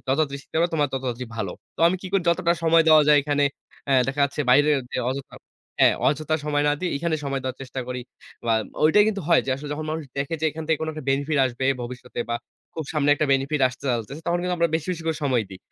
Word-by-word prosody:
যত - - -1
তাড়াতাড়ি 140 -3 0
শিখতে - - -8
পারো 170 - +3
তোমার 145 -2 +2
তত 135 - -2
তাড়াতাড়ি 125 0 -3
ভালো।" 105 -5 -2 0.3
তো - - -8
আমি 185 - 0
কি - - -5
করি 195 -2 +2
যতটা 170 0 +3
সময় 165 0 +5
দেওয়া 155 -1 +8
যায় 150 - +7
এখানে 145 0 +1 0.4
অ্যা 140 - 0 0.2
দেখা 135 +2 -2
যাচ্ছে 140 +1 -3
বাইরের 145 +3 +5
যে - - -4
অযথা 135 +1 -6 0.4
হ্যাঁ - - +6
অযথা 155 +2 +1
সময় 145 -1 +1
না - - +3
দিই। 180 -1 -1
এখানে 160 +2 -1
সময় 135 -1 -2
দেওয়ার 130 0 -4
চেষ্টা 130 0 -6
করি। 125 0 -3 0.5
বা 115 - +3 0.3
ওইটাই 205 +7 +6
কিন্তু 200 -3 -2
হয় 170 - +6
যে - - -1
আসলে 145 +2 -8
যখন 155 +1 -4
মানুষ 160 0 -3
দেখে 140 +4 -2
যে - - -1
এখান 160 +1 -7
থেকে 160 -1 +1
কোন 160 - -2
একটা 155 -2 -8
বেনিফিট 145 +2 0
আসবে 125 +1 -4 0.2
ভবিষ্যতে 120 0 -7
বা - - +1 0.4
খুব 160 - -4
সামনে 150 -2 +1
একটা 150 +1 0
বেনিফিট 135 +2 0
আসতে 130 +2 -13
চলতেছে 120 +5 -3
তখন 175 0 +1
কিন্তু 180 0 0
আমরা 170 0 +3
বেশি, 160 +1 -2
বেশি, 170 - -6
করে 160 -1 0
সময় 125 -5 +2
দিই। 95 - -9
145 Hz, 250 wpm, -24 LUFS, 135-160 Hz, 0.5 s, দেওয়া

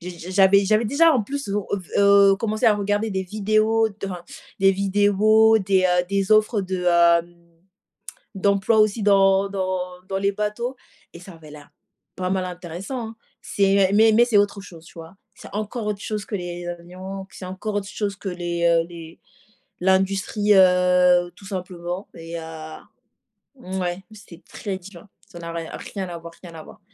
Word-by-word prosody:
J'ai 180 +1 -7 0.2
j'avais 195 +1 +5
j'avais 215 +3 +2
déjà 325 +7 +4
en 250 - +1
plus 280 +4 -5
v 200 - -1
heu, 200 0 -2
v 180 - -14 0.4
heu, - - +1
commencé 215 +3 -3
à 220 - +6
regarder 205 +2 -1
des 190 -1 -2
vidéos 215 +3 +1
dans 195 -2 -4 0.4
des 195 0 +5
vidéos 205 +3 +3
des, 190 -2 +1
heu, 180 -1 +2
des 200 +1 0
offres 215 0 +3
de 185 -1 -4
heu, 170 0 +3 1.0
d'emploi 200 +3 +2
aussi 215 0 +2
dans 195 -1 +4
dans 185 -1 -2 0.3
dans 195 - -2
les 200 +1 +1
bateaux 210 +5 -4 0.4
et 170 - -11
ça 185 +1 -12
avait 160 -2 -14
l'air 145 -1 -13 0.5
pas 185 0 -3
mal 185 -1 -1
intéressant, 180 +7 -6
hein? 225 - -12 0.3
C'est 195 -1 +2
mais 220 +2 +5
mais, 235 +2 +5
c'est 235 -4 +2
autre 200 0 +1
chose, 170 -4 -13
tu - - -16
vois? 165 +3 -12 0.2
C'est - - -13
encore 215 +2 -4
autre 210 -1 -3
chose 210 -2 -4
que 210 - -5
les 175 -2 -6
avions, 185 +3 -8
puis - - -16
c'est 185 - -7
encore 190 +4 -5
autre 200 -1 -2
chose 205 -2 -3
que 195 - -5
les, 175 -1 -3
heu, 165 -1 +3
les 165 -1 -11 0.6
l'industrie, 195 +2 +1
heu, 180 -1 +4
tout 195 - -16
simplement 180 -1 -6
et 165 0 -7
heu, 160 -1 -9 0.8
mouais 185 -4 -4
c'était 195 -5 -14
très 195 -3 -5
divin. 190 +1 -14 0.2
Ça 175 - -12
n'a 170 0 -7
rien, 165 -1 -6 0.2
rien 195 -3 -4
à 170 -1 -6
voir, 170 0 -11
rien 175 -3 -11
à 160 - -9
voir. - - -15
195 Hz, 185 wpm, -22 LUFS, 175-210 Hz, 1.0 s, à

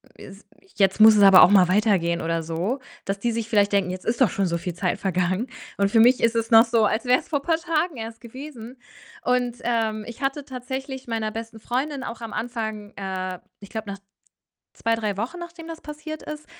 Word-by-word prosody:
es 195 +1 -13 0.3
jetzt 195 +1 +2
muss 220 0 +9
es - - +5
aber 195 -2 +9
auch - - +7
mal 195 -3 +6
weitergehen“, 185 -4 +2
oder 165 0 -1
so. 170 - -2 0.3
Dass 195 0 -2
die 235 +3 -1
sich 230 0 -3
vielleicht 205 -2 +2
denken: 195 -3 +2
„Jetzt 185 0 -7
ist 235 +3 -1
doch 255 - +6
schon 195 - -1
so 170 -1 -1
viel 175 +1 -5
Zeit 180 +2 -2
vergangen.“ 185 +4 0 0.3
Und 200 0 +1
für 225 - +4
mich 245 +3 +5
ist 230 0 +2
es 230 0 -1
noch 225 0 +9
so, 230 -2 +2
als 215 +2 0
wär's 250 +1 +2
vor 285 -3 0
paar 325 +2 +1
Tagen 330 -2 -1
erst 225 0 -7
gewesen 250 0 -10 0.5
und, 245 -1 +1
ähm, 225 -2 -1
ich 235 +2 -10
hatte 275 +1 -2
tatsächlich 265 0 -6
meiner 220 -1 -2
besten 225 0 -7
Freundin 265 +5 -3
auch 230 0 -7
am 225 -2 -6
Anfang, 220 -3 -4
äh 185 -2 -4 0.2
ich 200 - -12
glaube 220 -2 -5
nach 195 - -8 0.7
2, 230 0 0
3 210 -3 -3
Wochen 255 - -4
nachdem 340 -1 -9
das 330 -1 -8
passiert 305 +1 -8
ist, 305 0 -7
225 Hz, 215 wpm, -24 LUFS, 200-255 Hz, 0.7 s, muss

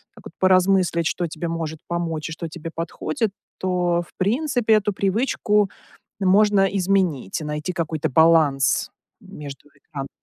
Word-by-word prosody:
так - - -17
вот - - -10
поразмыслить, 185 -2 +3
что 175 0 -1
тебе 160 +2 -5
может 165 -2 -4
помочь 165 -2 -3
и - - -7
что 165 0 -6
тебе 165 0 -8
подходит, 165 +5 -2 0.3
то, 180 -2 0
в - - -21
принципе, 240 +3 +1
эту 210 -1 +2
привычку 205 0 +1 0.5
можно 200 +1 +4
изменить 185 - 0
и - - -5
найти 150 +3 -3
какой-то 160 -4 -2
баланс 150 -3 +3 0.3
между 145 -8 -10
экранами. 140 -1 -9
175 Hz, 140 wpm, -22 LUFS, 155-195 Hz, 0.5 s, можно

